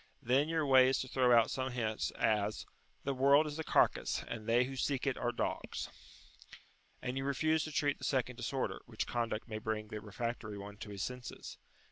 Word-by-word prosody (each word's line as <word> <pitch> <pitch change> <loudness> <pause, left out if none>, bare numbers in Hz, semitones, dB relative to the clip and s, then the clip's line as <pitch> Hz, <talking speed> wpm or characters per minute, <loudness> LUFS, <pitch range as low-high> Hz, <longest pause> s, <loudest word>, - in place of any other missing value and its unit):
Then 135 +6 +3
your 160 -2 +1
way 130 -2 +7
is 135 - +2
to 130 - -5
throw 125 -1 +3
out 115 -1 +6
some 130 0 -1
such 120 - -7
hint 110 -3 -1
as 105 -1 +1 0.4
"The 140 - 0
world 140 +3 +5
is 150 +1 -5
a - - -1
carcass, - - +2
and 110 -2 -6
they 120 +2 +5
who 135 +2 -5
seek 135 +1 -1
it 135 -2 +1
are 120 - -1
dogs." 120 - -3 1.1
And 125 +2 -2
you - - -2
refuse 155 +3 +1
to 155 - -6
treat 145 -1 +1
the - - -12
second 130 -2 0
disorder, 130 +2 -2
which 110 -2 -3
conduct 115 -2 -2
may 110 -2 -4
bring 110 -1 -3
the 105 -1 -5
refractory 110 0 -4
one 100 +1 -8
to 110 0 -8
his 100 -1 -4
senses. 125 -1 -7
125 Hz, 205 wpm, -34 LUFS, 110-135 Hz, 1.1 s, way